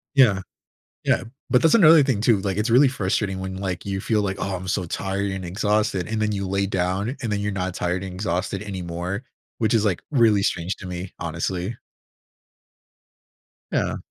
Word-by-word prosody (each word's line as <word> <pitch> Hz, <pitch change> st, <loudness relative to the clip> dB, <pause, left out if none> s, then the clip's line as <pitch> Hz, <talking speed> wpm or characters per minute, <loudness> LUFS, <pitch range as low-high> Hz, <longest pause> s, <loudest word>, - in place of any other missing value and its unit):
Yeah. 110 Hz, -9 st, +5 dB, 0.6 s
Yeah, -, -, +2 dB, 0.3 s
but 125 Hz, -, +4 dB
that's 165 Hz, -, +5 dB
another 165 Hz, -8 st, +8 dB
thing 130 Hz, -7 st, 0 dB
too, 110 Hz, -2 st, +4 dB
like, 95 Hz, -1 st, -2 dB
it's 105 Hz, +3 st, 0 dB
really 130 Hz, +4 st, +6 dB
frustrating 95 Hz, -4 st, -1 dB
when, 95 Hz, 0 st, -5 dB
like, 95 Hz, -2 st, -4 dB
you 95 Hz, -1 st, -2 dB
feel 105 Hz, +2 st, +1 dB
like, 95 Hz, -1 st, -2 dB
"Oh, 95 Hz, -1 st, -2 dB
I'm 90 Hz, +1 st, -6 dB
so 95 Hz, 0 st, 0 dB
tired 95 Hz, +3 st, -2 dB
and 95 Hz, -1 st, -4 dB
exhausted," 105 Hz, 0 st, 0 dB
and 110 Hz, -1 st, -2 dB
then 105 Hz, 0 st, +1 dB
you 100 Hz, -1 st, -2 dB
lay 100 Hz, +1 st, 0 dB
down, 95 Hz, +6 st, -1 dB
and 115 Hz, -, -1 dB
then 100 Hz, -, 0 dB
you're 105 Hz, 0 st, -1 dB
not 95 Hz, -2 st, -2 dB
tired 90 Hz, +1 st, -1 dB
and 95 Hz, -1 st, -6 dB
exhausted 95 Hz, 0 st, -2 dB
anymore, 90 Hz, +1 st, -4 dB, 0.3 s
which 110 Hz, -2 st, +1 dB
is, 110 Hz, -3 st, +3 dB
like, 100 Hz, -5 st, 0 dB
really 115 Hz, -7 st, +4 dB
strange 90 Hz, 0 st, -1 dB
to -, -, -10 dB
me, 90 Hz, +1 st, -5 dB
honestly. 90 Hz, +5 st, -3 dB, 2.0 s
Yeah. -, -, 0 dB
100 Hz, 185 wpm, -23 LUFS, 95-110 Hz, 2.0 s, another